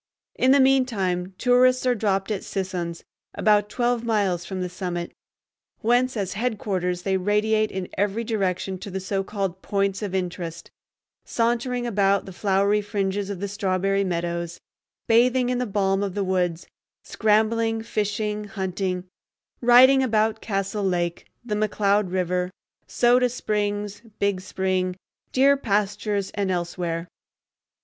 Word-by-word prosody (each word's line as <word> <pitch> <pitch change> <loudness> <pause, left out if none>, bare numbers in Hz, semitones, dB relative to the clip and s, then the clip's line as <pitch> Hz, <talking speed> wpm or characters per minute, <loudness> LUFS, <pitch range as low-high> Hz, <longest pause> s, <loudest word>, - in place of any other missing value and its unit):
In 255 - +2
the 280 +1 +6
mean 265 -1 +4
time 185 -5 -2
tourists 255 +1 +4
are 250 - +4
dropped 200 -2 0
at 200 - -2
Sisson's, 180 -3 -4 0.3
about 210 -1 +3
twelve 240 0 0
miles 200 -6 0
from 190 -1 -4
the 180 - -1
summit, 175 -1 -4 0.7
whence 245 +2 +2
as 190 -3 -2
headquarters 195 -6 -2
they 190 -1 +1
radiate 215 +3 +1
in 190 -1 -4
every 205 +3 0
direction 190 -4 -2
to 200 - -7
the 190 0 -3
so 195 +1 -2
called 195 -2 -3
"points 200 -1 -1
of 200 -3 -3
interest"; 175 -2 -4 0.5
sauntering 240 +1 0
about 200 -3 +2
the 190 - -9
flowery 200 +2 +2
fringes 200 -1 -2
of 200 -3 -4
the 200 - -2
Strawberry 195 -1 0
Meadows, 170 -1 -3 0.5
bathing 245 +2 +3
in 250 -1 0
the 250 - -1
balm 195 -1 +1
of 200 -2 -3
the 200 - 0
woods, 180 -2 -1 0.4
scrambling, 225 +1 +1
fishing, 210 -1 -2
hunting; 190 -2 -3 0.6
riding 255 +3 +7
about 220 -3 +1
Castle 195 0 -2
Lake, 175 -2 -1 0.2
the 220 - -3
McCloud 210 -2 +1
River, 180 -1 0 0.4
Soda 245 +1 +3
Springs, 205 -3 -2 0.2
Big 200 -2 0
Spring, 185 -1 -1 0.4
deer 275 +2 +5
pastures, 205 -4 -1
and 200 -2 -2
elsewhere. 175 -1 -2
200 Hz, 140 wpm, -24 LUFS, 185-220 Hz, 0.7 s, riding